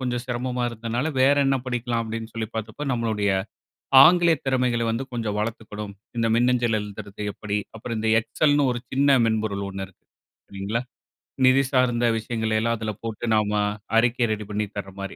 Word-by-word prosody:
கொஞ்சம் 125 -1 -2
சிரமமா 125 0 -2
இருந்ததுனால 115 +4 -3
வேற 140 +2 +5
என்ன 135 0 +3
படிக்லாம் 120 -1 -1
அப்டின்னு 115 0 -6
சொல்லி 110 -2 -3
பாத்தப்ப 110 +7 -5
நம்மளுடைய 110 -4 0 0.7
ஆங்கில 170 +1 +6
திறமைகள 125 -3 +1
வந்து 115 +4 -2
கொஞ்சம் 115 -4 -2
வளத்துக்கணும், 105 -2 -5 0.2
இந்த 115 - +2
மின்னஞ்சல் 120 -1 +2
எழுதுறது 105 0 -8
எப்டி, 105 0 -3 0.2
அப்புறம் 115 +1 -5
இந்த 110 - -1
Excelனு 145 +5 +2
ஒரு 120 - -3
சின்ன 135 0 +4
மென்பொருள் 110 -3 -1
ஒண்ணு 95 0 -5
இருக்கு, 95 - -26 0.4
சரிங்களா? 100 +4 -3 0.6
நிதி 130 +1 +6
சார்ந்த 120 -2 +2
விஷயங்களெல்லாம் 110 0 -1
அதுல 110 0 -3
போட்டு 115 0 -4
நாம 105 -1 +2 0.5
அறிக்கை 120 +1 +3
ரெடி 105 -1 -3
பண்ணி 105 0 -1
தர்ற 100 -1 -5
மாரி, 95 0 -6
115 Hz, 155 wpm, -24 LUFS, 105-125 Hz, 0.7 s, ஆங்கில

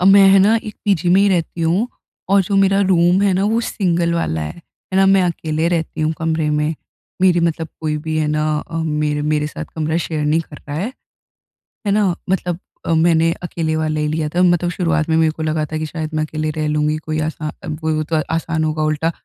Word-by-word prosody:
अ, - - +1
मैं 195 +1 +7
है 195 - +7
ना 210 +4 +5
एक 210 - -7
पीजी 190 -5 +1
में 185 +3 +5
ही 200 - +4
रहती 170 -2 -1
हूँ। 175 +9 +1 0.4
और 200 0 +5
जो 195 +2 -1
मेरा 195 0 +4
रूम 180 -1 +3
है 200 -1 +3
ना 190 +2 +1
वो 225 +3 +2
सिंगल 175 -6 0
वाला 80 - -1
है। 75 - -4
है 175 +2 -9
ना, 195 0 +5
मैं 195 -1 +5
अकेले 165 -2 -1
रहती 165 -3 -2
हूँ 155 +1 +1
कमरे 160 -1 0
में। 150 +1 0 0.5
मेरी 180 -2 +4
मतलब 165 -1 -1
कोई 155 -1 -1
भी 160 0 -2
है 155 - +1
ना 150 0 0
अ, 165 - -7
मेरे 150 -1 -1
मेरे 150 0 0
साथ 155 - -6
कमरा 160 0 -1
शेयर 155 -2 -2
नहीं 155 +2 +2
करता 150 -2 -10
है। 190 - -3 1.0
है - - +2
ना? 200 -4 +2
मतलब 180 -2 -1 0.3
अ, 165 - +1
मैंने 165 0 +3
अकेले 160 -2 -2
वाला 155 -1 -1
ही 150 - 0
लिया 155 0 -1
था। 175 +4 0
मतलब 175 -1 +3
शुरुआत 165 -3 0
में 160 - +3
मेरे 160 -1 +3
को 160 0 -6
लगा 155 0 0
था 155 - -2
कि 155 - -2
शायद 155 0 -5
मैं 155 0 0
अकेले 155 0 -3
रह 155 -1 0
लूँगी 150 0 +1
कोई 155 0 -2
आसा 155 -1 -5
वही 155 0 -2
होत 155 +1 -3 0.2
आसान 165 0 -1
होगा 155 0 -1
उल्टा 155 +2 0
160 Hz, 230 wpm, -19 LUFS, 155-180 Hz, 1.0 s, मैं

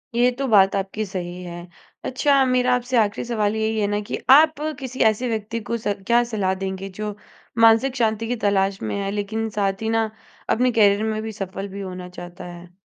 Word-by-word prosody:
ये 245 +1 +4
तो 275 - 0
बात 195 -4 +5
आपकी 195 +2 -2
सही 180 -2 -6
है। 175 -1 -7 0.5
अच्छा 275 +1 +3
मेरा 250 0 +2
आपसे 250 +1 -1
आख़िरी 210 -2 +1
सवाल 215 -3 0
यही 220 0 0
है 205 - +1
ना 205 0 0
कि - - -2
आप 305 +3 +7 0.2
किसी 260 -1 -7
ऐसे 245 +4 -4
व्यक्ति 220 0 -3
को 235 - 0
स 210 -2 -1
क्या 240 0 +4
सलाह 190 -3 +1
देंगे, 190 0 -4
जो 210 +2 -5 0.4
मानसिक 230 +3 +5
शांति 225 -2 0
की 245 - -1
तलाश 195 -1 +1
में - - -3
है 195 0 -2
लेकिन 220 +2 -2
साथ 195 0 0
ही 220 - -1
ना, 225 -1 +1 0.4
अपने 250 +2 +2
कैरियर 210 -2 +4
में 215 - -3
भी 220 - -4
सफल 195 -1 -5
भी 200 +1 -7
होना 180 -1 -7
चाहता 175 0 -10
है? 175 0 -11
215 Hz, 205 wpm, -22 LUFS, 195-235 Hz, 0.5 s, आप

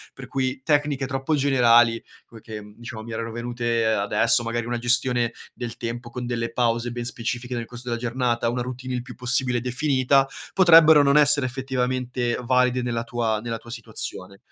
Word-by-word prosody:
per - - -9
cui 130 0 -2
tecniche 145 -2 +1
troppo 135 +3 -1
generali 120 -4 +4 0.2
come 115 -2 -15
che, 110 0 -8 0.2
diciamo, 120 -2 -8
mi 115 - -9
erano 115 +1 -4
venute 120 0 -2
adesso, 110 +2 +2
magari 115 0 -3
una 120 0 -3
gestione 120 0 +2 0.2
del 120 -2 -7
tempo 120 0 -5
con 125 +1 -6
delle 115 -1 -3
pause 120 0 0
ben 120 0 -5
specifiche 120 +1 -4
nel 120 -1 -3
corso 120 +1 -10
della 120 -1 -2
giornata, 120 -1 0
una 125 +1 -2
routine 130 +1 -5
il 125 - -3
più - - -10
possibile 125 -1 0
definita, 135 +1 +2 0.3
potrebbero 160 -5 +7
non 140 +1 +4
essere 145 -2 +4
effettivamente 125 -1 -2
valide 125 0 +2
nella 120 -1 -2
tua 115 -2 -1
nella 115 0 -4
tua 115 - -15
situazione. 100 -4 -6
120 Hz, 175 wpm, -23 LUFS, 115-130 Hz, 0.3 s, potrebbero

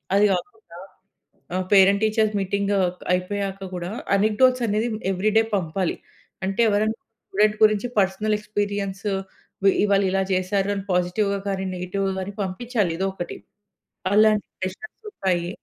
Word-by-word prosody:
అది 205 - +5
కాకుండా 225 +5 -4 1.0
ఆహ్, 185 0 -1
పేరెంట్ 200 +1 +6
టీచర్ 215 0 +2
మీటింగు 200 +1 0 0.4
అయిపోయాక 195 +1 -2
కూడా, 175 0 -4 0.3
అనెక్‌‌‌డోట్స్ 245 +5 +3
అనేవి 215 +3 0 0.3
ఎవ్రీడే 215 +4 +2
పంపాలి. 180 0 -1 0.5
అంటే, 195 +4 0
ఎవరైనా 215 +2 +1 0.3
స్టూడెంట్ 210 +2 +2
గురించి 215 +2 +4
పర్సనల్ 200 +3 +1
ఎక్స్‌పీరియన్సు, 205 -1 -2 0.5
వి 195 - +6
ఇవాళ 200 -1 +3
ఇలా 195 0 +1
చేసారు 190 +2 0
అని 195 - -4
పాజిటివ్‌గా 200 +3 +1
గాని, 190 0 -2
నెగెటివ్‌గా 190 +2 -2
గాని 200 +2 -6
పంపించాలి 200 -1 -1
ఎదో 195 - +1
ఒకటి. 175 - -5 0.8
అలాంటి 215 -1 +4
సెష్‌న్స్ 190 - -6
ఉంటాయి. 175 - -1
200 Hz, 125 wpm, -23 LUFS, 190-215 Hz, 1.0 s, పేరెంట్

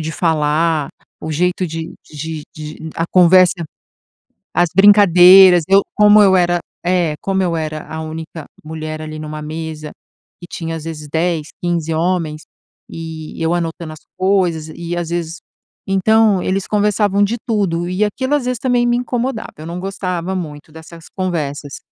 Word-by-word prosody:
de 160 0 -4
falar, 155 -2 +1 0.3
o 155 - -5
jeito 180 +3 0
de 160 0 -6 0.2
de 155 +1 -6
de 155 +1 -8
a 165 - 0
conversa, 185 +1 +5 1.0
as 175 -1 +2
brincadeiras, 190 -2 +7
eu 195 +1 +6
como 210 0 +6
eu 190 -1 +5
era 175 0 +2 0.3
é, 175 -3 +1
como 195 -1 0
eu 175 -2 0
era 155 -1 -4
a 160 0 -6
única 160 0 -7 0.2
mulher, 155 0 -6
ali, 155 0 -7
numa 155 0 -6
mesa, 155 0 -6 0.5
que 175 - -10
tinha 165 -1 -5
às 155 - -9
vezes 150 -2 -7
10, 160 -2 -1 0.2
15 170 -2 -1
homens, 165 -2 -1 0.5
e 160 -1 -8
eu 165 +1 +1
anotando 165 -2 -4
as 155 - -13 0.2
coisas, 185 -5 +1
e 170 0 -5
às 170 -1 -3
vezes 170 0 -3 0.5
então, 200 0 +3
eles 190 +1 -1
conversavam 205 -1 +1
de 220 +4 0
tudo, 180 -6 -1
e 185 +3 0
aquilo 260 +7 -1
às 290 - -1
vezes 250 -2 -2
também 245 -1 +1
me 240 0 +2
incomodava, 245 -1 -3
eu 155 - -9
não 170 +1 -5
gostava 185 -1 -3
muito 150 -4 -6
dessas 160 +1 -13
conversas. 150 -6 -3
170 Hz, 160 wpm, -17 LUFS, 160-190 Hz, 1.0 s, brincadeiras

